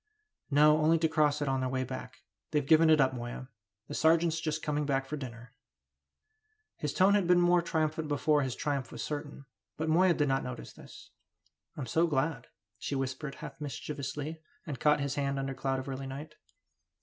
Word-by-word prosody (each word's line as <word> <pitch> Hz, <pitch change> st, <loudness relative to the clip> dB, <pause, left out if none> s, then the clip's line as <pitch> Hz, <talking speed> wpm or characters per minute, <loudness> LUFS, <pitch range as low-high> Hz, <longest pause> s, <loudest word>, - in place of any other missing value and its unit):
"No, 150 Hz, +1 st, +5 dB
only 160 Hz, +2 st, +4 dB
to 160 Hz, 0 st, +2 dB
cross 150 Hz, -2 st, +2 dB
it -, -, -3 dB
on 135 Hz, 0 st, +1 dB
their 130 Hz, 0 st, -1 dB
way 130 Hz, 0 st, -1 dB
back. 130 Hz, 0 st, -8 dB, 0.3 s
They've 150 Hz, -2 st, 0 dB
given 160 Hz, +2 st, +6 dB
it 155 Hz, -1 st, +6 dB
up, 130 Hz, -1 st, +3 dB
Moya! 120 Hz, +1 st, -6 dB, 0.4 s
The -, -, -7 dB
sergeant's 165 Hz, 0 st, +3 dB
just 155 Hz, -1 st, -2 dB
coming 150 Hz, 0 st, 0 dB
back 135 Hz, -2 st, 0 dB
for 150 Hz, -, -4 dB
dinner." 120 Hz, -3 st, -8 dB, 1.2 s
His 150 Hz, -, -2 dB
tone 190 Hz, +4 st, +4 dB
had 200 Hz, -4 st, +2 dB
been 180 Hz, 0 st, +5 dB
more 175 Hz, 0 st, +4 dB
triumphant 160 Hz, -1 st, -1 dB
before 150 Hz, 0 st, +2 dB
his 130 Hz, -3 st, -2 dB
triumph 140 Hz, -5 st, -2 dB
was -, -, -5 dB
certain, 145 Hz, -2 st, -5 dB, 0.3 s
but 160 Hz, 0 st, -2 dB
Moya 175 Hz, +2 st, +4 dB
did 145 Hz, -1 st, +1 dB
not 135 Hz, 0 st, +1 dB
notice 125 Hz, -2 st, -7 dB
this. -, -, -14 dB, 0.7 s
"I'm 140 Hz, -, -3 dB
so 165 Hz, +8 st, +2 dB
glad," 150 Hz, +1 st, -1 dB, 0.3 s
she 140 Hz, -, -3 dB
whispered, 135 Hz, +2 st, -3 dB
half -, -, -9 dB
mischievously, 145 Hz, +2 st, -5 dB, 0.2 s
and 145 Hz, -7 st, -5 dB
caught 150 Hz, +1 st, +3 dB
his 140 Hz, -1 st, -1 dB
hand 140 Hz, -1 st, -1 dB
under 135 Hz, 0 st, -2 dB
cloud 135 Hz, 0 st, -1 dB
of 130 Hz, -, -5 dB
early 135 Hz, 0 st, -5 dB
night. 145 Hz, +3 st, -7 dB
145 Hz, 190 wpm, -31 LUFS, 135-155 Hz, 1.2 s, given